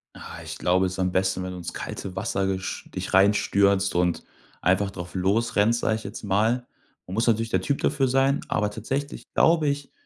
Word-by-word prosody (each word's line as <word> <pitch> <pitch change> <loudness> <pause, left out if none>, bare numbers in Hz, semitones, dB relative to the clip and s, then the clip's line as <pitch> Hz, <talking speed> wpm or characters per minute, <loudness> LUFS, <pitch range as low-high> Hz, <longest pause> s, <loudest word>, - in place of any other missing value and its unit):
Ah, - - -9
ich - - -7
glaube, 90 +1 +2
es 90 - -2
ist 95 - -7
am 90 -1 +1
besten, 95 0 0
wenn 95 - -4
du 90 - -7
ins 85 - -6
kalte 95 -2 -6
Wasser 95 -1 -1
gesch 95 0 -4
dich - - -4
reinstürzt 100 0 +3
und 90 -1 +1 0.4
einfach 95 +3 +2
drauf 90 -2 -8
losrennst, 105 +4 +2
sage 110 - +1
ich 110 - -6
jetzt - - -8
mal. 110 +5 +1 0.4
Man 90 - -8
muss 115 +4 0
natürlich 115 0 +2
der - - +1
Typ 140 0 -1
dafür 140 -2 +2
sein, 135 +2 +2
aber 105 - 0
tatsächlich 135 +7 -4
glaube 160 -2 +4
ich, 140 0 -2
100 Hz, 205 wpm, -25 LUFS, 95-120 Hz, 0.4 s, glaube